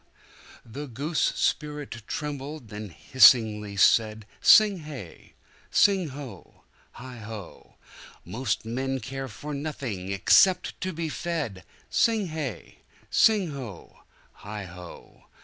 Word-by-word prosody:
The 140 +6 -7
goose 145 +7 -1
spirit 150 -6 -2
trembled, 145 -3 -5
then 105 -1 -7
hissingly 105 - +4
said 110 +1 +3 0.2
Sing 210 -3 +7
hey! 145 - -10 0.4
sing 195 -4 +3
ho! 135 -2 -11 0.3
heigho!"Most 110 -1 -7
men 130 +3 -2
care 135 +3 -6
for 145 +6 -7
nothing 130 -10 -4
except 180 - +3
to 185 - -2
be 165 -1 -3
fed!" 150 - -4 0.3
Sing 225 -3 +2
hey! 145 - -6 0.3
sing 205 -7 +4
ho! 125 -10 -9 0.4
heigho!" 90 -4 -10
130 Hz, 95 wpm, -26 LUFS, 110-150 Hz, 0.4 s, Sing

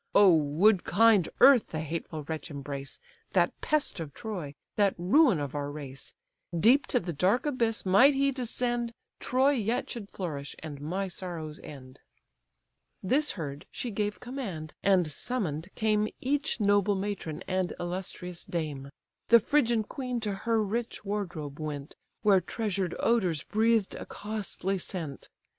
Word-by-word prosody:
Oh, 195 -4 +8
would 165 +7 +3
kind 210 -3 +4
earth 270 -4 +8
the 155 - -4
hateful 160 0 -4
wretch 160 +1 -5
embrace, 140 -1 -7 0.3
That - - +2
pest 300 - 0
of 155 -4 -6
Troy, 180 -11 -5 0.2
that 200 -2 +3
ruin 200 - +4
of 145 -2 -4
our 145 -1 -3
race! 140 -2 -8 0.4
Deep 250 - +5
to 250 - +2
the 175 -4 -4
dark 190 - +2
abyss 235 -8 0
might 245 +10 +6
he 275 0 +2
descend, 240 -2 -1 0.2
Troy 260 +3 +3
yet 235 -3 -1
should 210 -4 -6
flourish, 145 -7 -5
and 145 -3 -8
my 185 +6 -2
sorrows 170 -4 -6
end." 130 -2 -11 1.0
This 280 +10 +2
heard, 145 -5 -6
she 245 - -4
gave 205 0 -2
command: 200 - -6
and 190 -3 +4
summon'd 175 - -2
came 215 -1 +2
Each 285 +1 0
noble 205 -1 +3
matron 190 -5 -4
and 185 -1 0
illustrious 180 0 -5
dame. 150 -5 -4 0.4
The 235 - +8
Phrygian 235 -3 +2
queen 250 +2 -4
to 210 -2 -1
her 220 +3 0
rich 225 +1 -3
wardrobe 175 -8 -4
went, 150 -2 -5 0.3
Where 195 -3 +5
treasured 195 -2 -2
odours 185 -10 +1
breathed 220 -1 +2
a - - -7
costly 200 -2 -3
scent. 165 -6 -5
195 Hz, 145 wpm, -29 LUFS, 155-230 Hz, 1.0 s, Oh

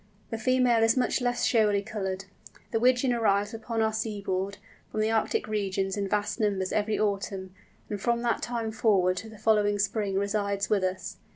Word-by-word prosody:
The 225 - -3
female 250 -1 +3
is 225 +3 +4
much 250 0 +1
less 245 0 0
showily 210 -4 +3
coloured. 195 -3 -4 0.5
The 225 - +1
Wigeon 250 +1 +3
arrives 205 -2 +1
upon 225 0 -2
our 220 0 +1
seaboard, 200 -3 -2 0.3
from - - -3
the 215 +1 +2
Arctic 225 -1 +1
regions, 195 -2 -1
in 200 -1 -1
vast 210 +3 -1
numbers 200 -3 0
every 215 0 +1
autumn, 195 -2 -2 0.3
and 205 -2 -4
from 235 +2 +1
that 235 -1 0
time 230 -2 -2
forward 195 -5 +2
to 220 - -6
the 220 - -12
following 205 -1 +2
spring 205 -1 0
resides 200 0 -1
with 200 -3 +3
us. 185 0 -3
210 Hz, 180 wpm, -28 LUFS, 200-225 Hz, 0.5 s, is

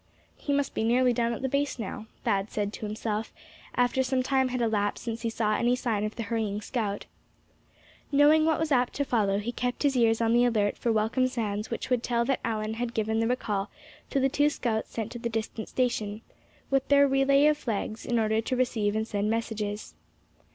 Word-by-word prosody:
"He 290 - -4
must 285 0 0
be - - -1
nearly 245 +2 +3
down 235 0 +1
at 235 - -5
the - - +2
base 280 +1 0
now," 220 0 -6 0.2
Thad 195 +1 0
said 205 0 -2
to 215 - -5
himself, 215 +1 -3 0.4
after 245 +1 +2
some 260 0 +1
time 265 0 +2
had 255 0 -2
elapsed 210 -3 0
since 230 -1 -4
he 230 - -1
saw 220 -1 0
any 240 +3 +2
sign 225 -5 -1
of 215 0 -3
the 230 - -3
hurrying 215 -2 -2
scout. 210 -2 -3 1.1
Knowing 295 +2 +6
what 320 -1 +2
was 320 -1 -1
apt 250 -2 +2
to 285 - -1
follow, 205 -6 +1
he 210 +4 -2
kept 245 +2 -2
his 280 -2 +2
ears 225 -2 +3
on 230 0 +2
the 240 +1 +5
alert 215 -4 +2
for 235 - -1
welcome 225 +4 +2
sounds 215 -4 -3
which 235 - -4
would 250 -2 +3
tell 235 -1 0
that 270 0 0
Allan 215 -1 -2
had 240 +1 -4
given 220 0 0
the 225 - +1
recall 210 -5 -1 0.4
to 275 - +1
the 270 - +3
two 290 +2 +2
scouts 225 -6 -2
sent 225 -1 -4
to 240 - -6
the 235 0 -2
distant 225 0 -4
station, 220 -4 -1 0.5
with 270 -1 +2
their 280 0 +6
relay 275 +1 +4
of 300 0 +5
flags, 220 -1 -3
in 240 - 0
order 220 0 +2
to 255 +3 -2
receive 225 -5 0
and 220 0 -1
send 205 0 -1
messages. 215 -2 -3
230 Hz, 215 wpm, -28 LUFS, 215-255 Hz, 1.1 s, Knowing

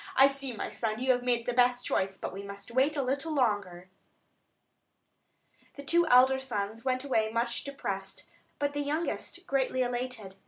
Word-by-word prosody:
I 270 - +8
see, 275 -1 -4
my 225 - -4
son, 220 -2 -2
you 260 +2 +2
have 245 -1 +1
made 240 -2 0
the 245 - -1
best 245 0 +3
choice; 190 0 0
but - - -5
we 195 - -6
must 200 +2 -9
wait 270 +5 +2
a 280 - +1
little 275 +5 -1
longer." 200 -8 0 1.9
The 280 - -8
two 340 +3 +3
elder 260 0 +6
sons 225 -3 -4
went 255 0 0
away 220 -6 +1
much 235 +1 -1
depressed; 195 -9 -5 0.3
but 285 0 -1
the 290 - -2
youngest 320 +4 -3
greatly 265 -3 +1
elated. 245 -5 -4
250 Hz, 170 wpm, -30 LUFS, 220-275 Hz, 1.9 s, I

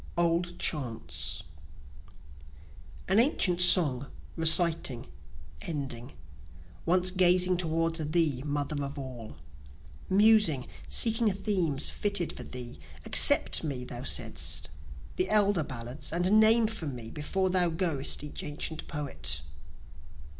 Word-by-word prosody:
Old 175 +1 -1
Chants 130 -8 -4 1.6
An 195 +4 +2
ancient 190 - +1
song, 145 -7 +4 0.3
reciting, 160 -6 +2 0.6
ending, 135 - -7 0.7
Once 180 +1 +3
gazing 180 0 +3
toward 165 -1 -1
thee, 155 -6 +1
Mother 145 0 -4
of 140 +1 -7
All, 125 - -9 0.7
Musing, 200 - +3 0.2
seeking 225 -1 +2
themes 185 -8 -2
fitted 200 -5 0
for - - -8
thee, 125 -1 -8 0.3
Accept 75 +2 +6
me, 135 -5 -5
thou 120 -1 -8
saidst, - - 0 0.5
the 185 - +1
elder 205 -4 +4
ballads, 125 0 -6
And 180 +6 +2
name 225 +1 +5
for 215 -7 -4
me 120 -4 -8
before 185 +5 -2
thou 180 -1 +3
goest 160 -5 -3
each 150 - -7
ancient 150 +2 -5
poet. 75 - -4
165 Hz, 110 wpm, -28 LUFS, 135-185 Hz, 1.6 s, Accept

